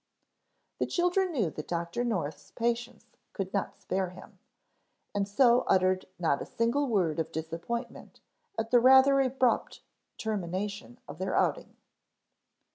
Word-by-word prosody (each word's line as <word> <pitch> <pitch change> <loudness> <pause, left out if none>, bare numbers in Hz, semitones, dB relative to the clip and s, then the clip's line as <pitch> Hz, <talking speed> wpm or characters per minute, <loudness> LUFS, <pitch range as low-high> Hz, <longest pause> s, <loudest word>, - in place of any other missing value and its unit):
The - - 0
children 360 +1 +1
knew 215 - 0
that 155 - -7
Dr. 170 +6 -2
North's 160 -11 -3
patients 235 0 -2 0.3
could 190 -2 -4
not 200 - -2
spare 190 -1 -2
him, 185 +1 -14 0.7
and 200 -1 0
so 240 +3 +5
uttered 185 0 +2
not 160 -5 +1
a - - -4
single 240 +5 0
word 180 - +1
of 160 - -2
disappointment 170 - -5 0.4
at 225 - -2
the 245 - +7
rather 265 +2 +7
abrupt 260 -1 0 0.4
termination 200 - -4
of 145 +3 -9
their 190 0 -2
outing. - - 0
205 Hz, 130 wpm, -29 LUFS, 175-245 Hz, 0.7 s, the